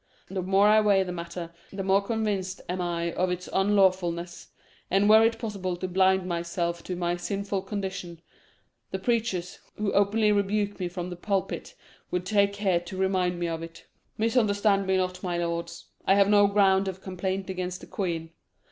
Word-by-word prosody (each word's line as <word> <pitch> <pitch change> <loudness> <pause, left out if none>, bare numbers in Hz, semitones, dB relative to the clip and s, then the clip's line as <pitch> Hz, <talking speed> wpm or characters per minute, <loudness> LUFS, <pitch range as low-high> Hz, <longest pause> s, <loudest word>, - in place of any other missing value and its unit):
The 190 -1 -2
more 195 +3 +4
I 215 +1 +6
weigh 200 -2 +4
the 180 - -5
matter, 170 0 -6 0.2
the 195 0 -4
more 195 +1 +3
convinced 200 -4 -2
am 180 +1 -2
I 170 -1 -2
of 185 0 0
its 180 0 -3
unlawfulness; 185 -3 +1 0.4
and 195 +2 +3
were 220 +1 +7
it 225 0 +2
possible 200 -6 -3
to 185 - -3
blind 190 0 +3
myself 170 0 -2
to 180 - -3
my 175 0 -1
sinful 200 +2 -2
condition, 190 -4 -5 0.7
the 190 - -3
preachers, 195 -4 -1 0.2
who 210 -1 -1
openly 210 +2 +3
rebuke 205 0 0
me 180 - -1
from 175 0 -5
the - - -5
pulpit, 195 +2 -3 0.3
would 180 0 -2
take 200 +1 +3
care 195 -4 +1
to 175 +2 -9
remind 185 -2 +1
me 175 - -1
of 165 -1 -3
it. 165 0 -10 0.3
Misunderstand 210 -3 +2
me 190 0 +3
not, 185 0 -2
my 175 -2 -2
lords. 170 0 -3 0.2
I 195 - +6
have 200 0 +4
no 205 -1 +6
ground 195 -1 +3
of 190 0 -5
complaint 190 +1 -3
against 180 -1 -4
the - - -9
queen. 165 -4 -3
190 Hz, 180 wpm, -27 LUFS, 175-200 Hz, 0.7 s, were